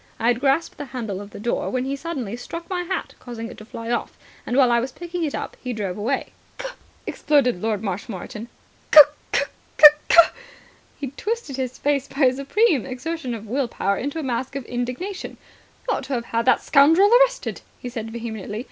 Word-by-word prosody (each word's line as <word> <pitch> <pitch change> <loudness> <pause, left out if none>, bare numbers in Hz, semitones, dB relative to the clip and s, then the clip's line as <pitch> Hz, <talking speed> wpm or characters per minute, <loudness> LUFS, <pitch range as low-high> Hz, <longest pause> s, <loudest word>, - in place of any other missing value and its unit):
I 230 - +2
had 240 -1 +2
grasped 275 +4 +1
the 290 - -4
handle 225 -7 -5
of 200 - -10
the - - -10
door, 235 +3 -1
when 255 0 -1
he 275 +1 -2
suddenly 275 -8 -4
struck 335 +7 -7
my 360 -1 0
hat, 365 +2 -4
causing 230 -2 -7
it - - -11
to 215 - -11
fly 230 +1 -6
off. 240 - -2 0.3
And, 245 - 0
while 255 -3 +5
I 235 - +4
was 255 +2 -3
picking 345 +3 -5
it 300 - -2
up, - - -5
he 250 -1 -3
drove 200 -5 -3
away." 235 +6 -2 0.3
"C'k," - - -5 0.3
exploded 260 -10 +1
Lord 220 -2 -1
Marshmoreton. 205 +2 -5 0.4
"C'k, 305 - +10 0.3
c'k, - - +1 0.6
c'k." - - +5 0.8
He 275 -3 -4
twisted 425 - -4
his 255 -1 -3
face 280 -2 0
by 275 - -6
a 255 -2 +5
supreme 280 - +2
exertion 265 0 -4
of 220 -1 -9
will 255 +4 -1
power 200 -3 -1
into 285 +5 -3
a 320 - -3
mask 260 +1 -3
of 275 -3 -4
indignation. 250 +11 -4 0.5
"You - - +1
ought - - -6
to 270 - -4
have 235 -1 -3
had 230 0 -1
the 260 - +5
scoundrel 325 +9 +5
arrested," - - +1 0.2
he - - -8
said 225 -2 -5
vehemently. 220 -2 -5
255 Hz, 200 wpm, -23 LUFS, 230-290 Hz, 0.8 s, C'k